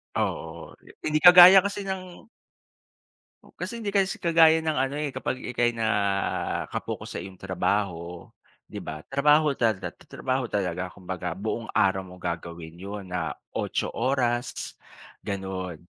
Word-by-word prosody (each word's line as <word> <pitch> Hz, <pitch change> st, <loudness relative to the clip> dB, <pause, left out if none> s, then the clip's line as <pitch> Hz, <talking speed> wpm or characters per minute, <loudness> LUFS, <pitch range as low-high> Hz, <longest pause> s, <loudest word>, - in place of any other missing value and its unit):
Oo, 80 Hz, 0 st, -3 dB, 0.2 s
hindi 155 Hz, 0 st, -1 dB
kagaya 180 Hz, +2 st, +10 dB
kasi 200 Hz, -1 st, -4 dB
ng 185 Hz, 0 st, -6 dB, 1.3 s
Kasi, 235 Hz, -, -5 dB
hindi 200 Hz, -2 st, -2 dB
kasi 195 Hz, -1 st, +1 dB
kagaya 165 Hz, -1 st, +5 dB
ng 155 Hz, -3 st, -1 dB
ano, 135 Hz, +2 st, 0 dB
eh, 150 Hz, -2 st, -2 dB
kapag 130 Hz, -, -3 dB
ika'y 120 Hz, -1 st, 0 dB
naka-focus 100 Hz, -3 st, -2 dB
sa -, -, -3 dB
iyong 95 Hz, -1 st, -11 dB
trabaho 90 Hz, -3 st, -2 dB, 0.4 s
di -, -, -5 dB
ba, 75 Hz, 0 st, -7 dB
trabaho 150 Hz, +2 st, +4 dB
tata 115 Hz, -7 st, -1 dB, 0.2 s
trabaho 130 Hz, -1 st, -2 dB
talaga 95 Hz, -4 st, -2 dB
kumbaga 90 Hz, -2 st, -5 dB
buong 110 Hz, +3 st, -4 dB
araw 95 Hz, 0 st, +2 dB
mo 90 Hz, -, -12 dB
gagawin 85 Hz, -1 st, -6 dB
'yon 100 Hz, +1 st, -6 dB
na 85 Hz, -3 st, -2 dB, 0.2 s
8 -, -, -2 dB
oras 125 Hz, -2 st, -1 dB, 0.5 s
gano'n. 95 Hz, -3 st, -4 dB
110 Hz, 130 wpm, -26 LUFS, 95-150 Hz, 1.3 s, kagaya